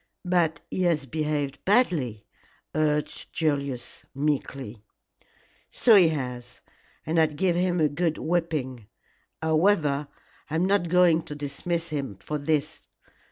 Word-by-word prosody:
"But 170 -4 +1
he - - -2
has 165 -6 +1
behaved 145 -1 -2
badly," 160 - +1 0.5
urged 150 -1 -1
Julius, 140 -5 -2
meekly. 135 -6 -2 0.9
"So 235 - +4
he 190 -5 +8
has, 125 -5 -4 0.4
and 165 +2 +1
I'd 155 -2 +2
give 175 +2 +1
him 180 0 +1
a 155 - +4
good 160 +2 -1
whipping. 155 -9 -2 0.6
However, 155 -3 +2 0.4
I 155 - -3
am 170 +3 +2
not 195 -3 +2
going 175 -2 +5
to 150 - -7
dismiss 165 +4 -3
him 140 -9 -3
for 150 +8 -4
this. 145 0 -1
155 Hz, 125 wpm, -26 LUFS, 140-170 Hz, 0.9 s, he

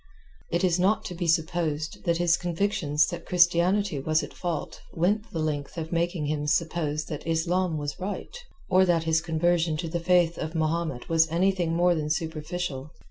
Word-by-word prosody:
It 170 +2 0
is 180 -1 +2
not 195 +4 +2
to - - -5
be 175 0 -3
supposed 160 -2 -1
that 170 -1 +2
his 175 -1 +3
convictions 170 -4 +1
that 175 - -7
Christianity 180 0 +3
was 155 +3 +1
at - - -8
fault 170 -4 -4
went 205 +6 +1
the - - -5
length 150 -1 -3
of 160 -1 -4
making 170 -2 0
him 150 0 -2
suppose 155 -1 0
that 150 0 -7
Islam 165 +1 0
was 145 +2 -4
right, 200 - -5 0.3
or 185 0 +5
that 175 -3 +2
his 160 0 +2
conversion 165 0 +1
to 165 +1 -3
the 170 +1 -2
Faith 175 -1 +2
of 160 +1 -4
Mahomet 160 -4 -1
was 160 0 +3
anything 175 0 +1
more 175 +1 +4
than 155 -2 -2
superficial. 155 -2 -3
165 Hz, 180 wpm, -26 LUFS, 155-175 Hz, 0.3 s, or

